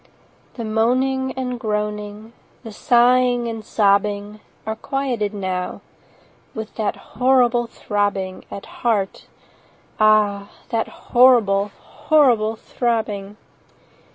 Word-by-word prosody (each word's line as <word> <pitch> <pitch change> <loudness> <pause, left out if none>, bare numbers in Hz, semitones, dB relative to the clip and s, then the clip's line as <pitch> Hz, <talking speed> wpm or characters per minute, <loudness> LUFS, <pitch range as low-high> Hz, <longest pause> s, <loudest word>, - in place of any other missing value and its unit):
The 235 - -5
moaning 255 +4 +1
and 250 -2 -4
groaning, 210 0 -4 0.3
The 225 - -8
sighing 245 +1 +3
and 225 -1 -5
sobbing, 205 0 +1 0.2
20 - - -34
Are 220 - -3
quieted 245 -4 -2
now, 185 -3 -4 0.7
With 220 -1 -6
that 215 -2 -2
horrible 245 -1 +2
throbbing 200 -4 -2
At 200 - -8
heart—ah, 210 -1 -1 0.2
that 225 -1 -1
horrible, 225 -6 +3
Horrible 240 -8 +2
throbbing! 215 -4 -3
220 Hz, 95 wpm, -21 LUFS, 205-245 Hz, 0.7 s, sighing